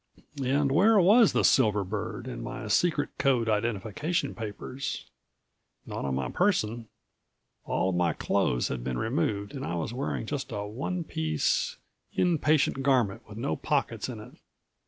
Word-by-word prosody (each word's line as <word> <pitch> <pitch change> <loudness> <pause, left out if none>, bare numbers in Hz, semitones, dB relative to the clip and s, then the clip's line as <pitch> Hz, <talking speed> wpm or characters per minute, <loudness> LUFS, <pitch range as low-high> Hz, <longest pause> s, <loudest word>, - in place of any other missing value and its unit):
And 140 +2 +2
where 205 +8 +5
was 210 +5 +6
the - - +1
silver 105 -6 +4
bird 105 +5 -4
and 125 -2 -6
my 130 -2 -6
secret 150 +4 +2
code 125 -5 +2
identification 115 - -1
papers? 115 +5 -5 0.8
Not - - -5
on 65 -1 -1
my 65 -2 -2
person. 120 - +1 0.8
All 95 - 0
of 95 - -1
my 85 -2 +2
clothes - - 0
had 60 -2 -4
been 65 -1 -2
removed 110 -5 -1
and 135 -2 -5
I 90 - -2
was 85 +7 -3
wearing 130 -3 -2
just 140 +1 -4
a 105 -2 -3
one 140 - -3
piece, 80 - 0 0.4
in 175 -3 +2
patient 150 -3 +2
garment 120 -5 +1
with 105 - -9
no 80 -8 -1
pockets - - -1
in - - -6
it. - - -11
120 Hz, 155 wpm, -28 LUFS, 100-145 Hz, 0.8 s, was